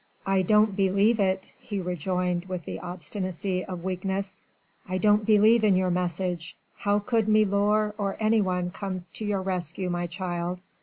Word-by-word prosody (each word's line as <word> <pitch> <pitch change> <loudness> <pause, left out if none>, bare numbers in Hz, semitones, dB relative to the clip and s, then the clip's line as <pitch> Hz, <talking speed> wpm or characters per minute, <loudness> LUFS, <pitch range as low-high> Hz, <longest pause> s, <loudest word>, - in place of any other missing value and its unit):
"I 195 -1 +2
don't 210 +2 +3
believe 200 +4 +3
it," 190 -1 +1 0.2
he 220 -5 -4
rejoined 180 0 -1
with 185 -3 -5
the - - -5
obstinacy 185 +2 -3
of 180 -2 -7
weakness. 190 +1 -3 0.5
"I 185 - 0
don't 210 +1 +3
believe 220 +1 +5
in 205 -3 +5
your 185 -1 +2
message... 175 -1 -2 0.2
how 205 0 +1
could 220 +1 0
milor 210 0 +3
or 200 -1 -1
anyone 190 -5 +1
come 185 -2 -5
to 220 - -5
your 200 -2 -1
rescue, 180 -1 -2
my 175 0 -1
child?... 175 0 -3
190 Hz, 155 wpm, -27 LUFS, 180-205 Hz, 0.5 s, believe